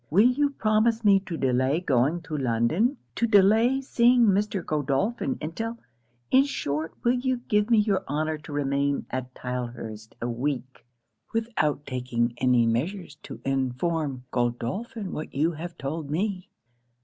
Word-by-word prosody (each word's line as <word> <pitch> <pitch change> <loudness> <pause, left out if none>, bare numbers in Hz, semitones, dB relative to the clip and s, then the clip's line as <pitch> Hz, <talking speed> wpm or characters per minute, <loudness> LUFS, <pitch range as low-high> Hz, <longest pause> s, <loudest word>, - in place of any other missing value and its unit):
Will 210 +10 +5
you 285 +3 +2
promise 220 -2 +1
me 200 -1 +6
to 170 -4 -3
delay 130 +3 +1
going 145 +1 +1
to 155 - -5
London 135 - +1 0.2
to 235 - 0
delay 220 +5 +4
seeing 245 -2 +4
Mr. 200 -2 +1
Godolphin 155 - -1
until 225 +10 -4 0.5
in 265 +1 +6
short, 155 - -3
will 240 0 +4
you 255 0 0
give 210 +1 +2
me 230 - +5
your 205 -2 +2
honour 155 +2 -1
to 150 - -11
remain 140 0 0
at 130 0 -4
Tylehurst 120 -3 -6
a 120 - -2
week, 130 0 -4 0.5
without 220 - 0
taking 125 -2 -1
any 125 -2 +4
measures 155 - -1
to - - -9
inform 135 +1 -1
Godolphin 130 - -2
of - - -7
what 155 - -6
you 155 +5 +2
have 170 +2 -7
told 145 +2 -4
me. 185 +4 -2
155 Hz, 150 wpm, -26 LUFS, 130-215 Hz, 0.5 s, me